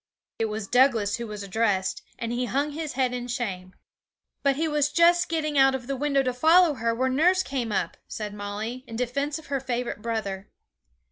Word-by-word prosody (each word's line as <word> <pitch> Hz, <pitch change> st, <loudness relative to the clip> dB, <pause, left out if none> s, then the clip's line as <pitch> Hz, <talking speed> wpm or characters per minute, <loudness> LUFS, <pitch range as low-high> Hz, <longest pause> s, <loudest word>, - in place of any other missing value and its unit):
It 225 Hz, -, +2 dB
was 215 Hz, -1 st, -4 dB
Douglas 235 Hz, -4 st, +3 dB
who 235 Hz, -1 st, -5 dB
was 210 Hz, -1 st, -6 dB
addressed, 200 Hz, -2 st, 0 dB, 0.2 s
and 230 Hz, 0 st, -4 dB
he 245 Hz, +1 st, -1 dB
hung 280 Hz, +4 st, -1 dB
his 310 Hz, 0 st, -4 dB
head 255 Hz, -1 st, 0 dB
in 245 Hz, -1 st, -4 dB
shame. 190 Hz, -7 st, -4 dB, 0.7 s
'But 275 Hz, -1 st, +2 dB
he 320 Hz, +3 st, 0 dB
was 295 Hz, -1 st, +1 dB
just 345 Hz, +2 st, +4 dB
getting 305 Hz, -3 st, 0 dB
out 270 Hz, 0 st, +5 dB
of 255 Hz, -2 st, -5 dB
the 275 Hz, +2 st, -2 dB
window 280 Hz, 0 st, +1 dB
to 255 Hz, -1 st, -1 dB
follow 320 Hz, +5 st, +5 dB
her, 230 Hz, -3 st, -1 dB
when 260 Hz, +2 st, 0 dB
nurse 365 Hz, +6 st, +4 dB
came 250 Hz, -5 st, -3 dB
up,' 175 Hz, -4 st, -1 dB
said 210 Hz, -1 st, -5 dB
Molly, 210 Hz, +5 st, -5 dB
in 230 Hz, -, -7 dB
defence 280 Hz, +5 st, -1 dB
of 320 Hz, -, -12 dB
her 275 Hz, -, +1 dB
favourite 245 Hz, -4 st, -3 dB
brother. 210 Hz, -4 st, -3 dB
250 Hz, 200 wpm, -26 LUFS, 220-285 Hz, 0.7 s, out